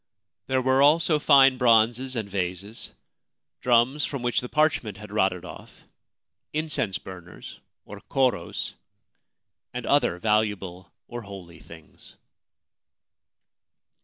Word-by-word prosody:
There 130 -1 0
were 130 +1 +3
also 155 +2 +4
fine 135 -3 +5
bronzes 120 +2 +3
and 110 -3 -3
vases, 95 +2 -5 0.7
drums 125 +4 +2
from 140 -4 -4
which 120 -1 +1
the 125 - -7
parchment 150 -10 0
had 105 0 -11
rotted 95 -4 0
off, - - -12 0.7
incense 150 -11 -1
burners, 90 -2 -11 0.3
or - - -11
koros, 130 -10 -1 1.0
and 125 -2 -4
other 140 -11 +2
valuable 105 -3 -1 0.2
or 120 0 -7
holy 95 -5 -11
things. 80 -1 -15
115 Hz, 105 wpm, -25 LUFS, 95-130 Hz, 1.0 s, fine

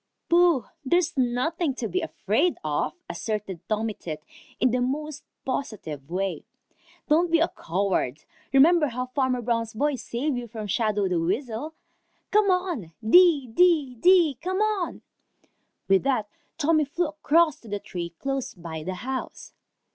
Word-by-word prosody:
"Pooh! 340 - +4 0.2
There's 345 +4 +1
nothing 270 +4 0
to 235 - -3
be 370 - -1
afraid 320 - 0
of," 150 -1 -1
asserted 210 -5 -4
Tommy 215 0 0
Tit 155 -5 -7 0.4
in 255 - +3
the 250 +1 +1
most 300 +4 -3 0.2
positive 175 - -4
way. 190 +2 -2 0.6
"Don't 330 +4 +3
be 335 0 +4
a 335 - +2
coward. 170 -6 -1 0.3
Remember 300 +4 +5
how 250 0 -3
Farmer 255 -1 -1
Brown's 230 -1 -1
boy 290 +6 +1
saved 250 +3 -2
you 240 - -7
from 220 -1 -6
Shadow 205 -1 +1
the 180 -2 0
Weasel. 230 - -2 0.6
Come 420 -1 +4
on! 350 - -1
Dee, 335 -1 +6
dee, 295 +1 +3
dee, 320 0 +4
come 370 +1 -2
on!" 420 -4 -1 0.8
With 195 -1 +4
that 255 -6 0 0.3
Tommy 310 0 +3
flew 335 +3 -1
across 310 0 +2
to 230 - -16
the 205 -1 -2
tree 175 -3 -5
close 270 +10 -4
by 165 -3 -7
the 185 +4 -4
house. 260 0 -5
255 Hz, 145 wpm, -26 LUFS, 210-320 Hz, 0.8 s, Dee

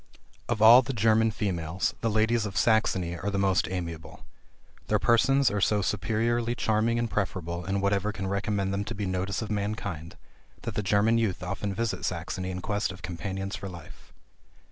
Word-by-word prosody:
Of 110 -2 +1
all 120 +3 +10
the 130 +1 -4
German 110 0 +3
females, 90 -5 -2
the 115 - +1
ladies 110 +1 +2
of 95 -4 -6
Saxony 90 -2 +2
are 95 +4 -3
the 100 - -2
most 95 -1 +2
amiable. 85 -3 -6 0.6
Their 105 - +3
persons 125 +5 +3
are 105 -1 -1
so 105 0 +2
superiorly 115 +4 0
charming 110 +1 +1
and 120 0 0
preferable 90 -5 -3
in 100 +1 -1
whatever 100 +1 +1
can 95 -3 -5
recommend 100 0 -1
them 100 +1 -1
to 110 - -5
be 100 0 -3
notice 95 +3 -2
of 110 - -6
mankind, 100 -5 -4 0.5
that - - -4
the - - -1
German 105 +3 +3
youth 100 -5 -1
often 100 +2 -3
visit 115 +1 -2
Saxony 95 0 -3
in 90 0 -4
quest 105 +1 -1
of 95 - -12
companions 95 +2 -4
for 95 - -6
life. 85 -4 -12
100 Hz, 180 wpm, -27 LUFS, 95-110 Hz, 0.6 s, all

